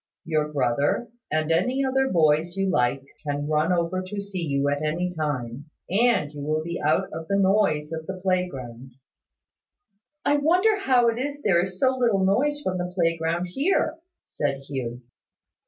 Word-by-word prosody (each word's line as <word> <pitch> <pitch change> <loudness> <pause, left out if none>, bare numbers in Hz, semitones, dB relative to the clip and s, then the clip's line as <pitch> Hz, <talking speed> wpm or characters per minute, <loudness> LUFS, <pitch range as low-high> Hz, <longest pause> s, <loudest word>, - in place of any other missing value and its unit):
Your 155 -2 0
brother, 140 - 0 0.2
and 155 +1 0
any 250 +12 +1
other 265 0 +1
boys 160 +1 +2
you 195 -1 +1
like, 125 0 +1 0.2
can 145 -1 -2
run 155 +3 +1
over 175 +1 0
to 185 +2 -6
see 200 -2 -5
you 140 -3 0
at 145 0 0
any 170 +4 -1
time; 145 -5 -3 0.3
and 205 -8 +2
you 145 - -7
will 155 +2 -1
be 170 +1 -4
out 150 +1 +1
of 160 0 -6
the 200 - +1
noise 190 -6 +2
of 160 -1 -5
the 190 -1 -5
playground." 135 -10 -3 1.3
"I 290 - +4
wonder 365 +8 +3
how 255 -9 +3
it 230 +1 -2
is 285 +2 -4
there 175 -3 +3
is 185 0 -6
so 260 -1 +3
little 230 -7 +2
noise 290 +10 +1
from 185 -1 -1
the 180 0 -3
playground 165 0 0
here," 315 - 0 0.3
said 140 -2 -2
Hugh. 130 -3 -5
170 Hz, 170 wpm, -25 LUFS, 150-205 Hz, 1.3 s, I